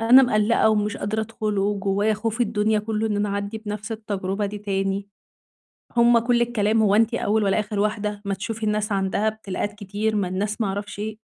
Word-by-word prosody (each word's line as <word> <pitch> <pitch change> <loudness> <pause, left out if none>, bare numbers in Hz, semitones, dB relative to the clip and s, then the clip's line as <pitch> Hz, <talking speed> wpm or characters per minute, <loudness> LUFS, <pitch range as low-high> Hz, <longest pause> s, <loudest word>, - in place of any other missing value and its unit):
أنا 245 +4 +8
مقلّقة 220 -2 +3
ومش 210 -1 0
قادرة 220 +2 -2
أدخّل 215 -2 -3
وجوايا 200 +1 +1
خوف 225 +2 -3
الدنيا 215 -1 +2
كلّه 215 +1 -1
إن 205 - -1
أنا 205 0 0
أعدّي 200 +2 -3
بنفس 210 0 -5
التجربة 205 -2 -2
دي 205 +1 -6
تاني، 195 0 -2 0.9
هُم 235 0 +6
كلّ 240 +1 +2
الكلام، 225 -2 +2
هو 205 -1 +4
أنتِ 225 +2 +3
أول 215 -2 +1
والّا 195 +2 +2
آخِر 210 -1 -4
واحدة، 210 -1 -1
ما 200 0 -1
تشوفي 220 +3 -5
الناس 210 0 0
عَندها 195 +2 0
إبتلائات 205 -2 -3
كتير، 210 +1 -2
ما 190 -3 0
الناس 205 +4 -2
ما 215 - +2
أعرفش 205 +1 -4
إيه، 215 +1 -4
210 Hz, 190 wpm, -23 LUFS, 200-220 Hz, 0.9 s, أنا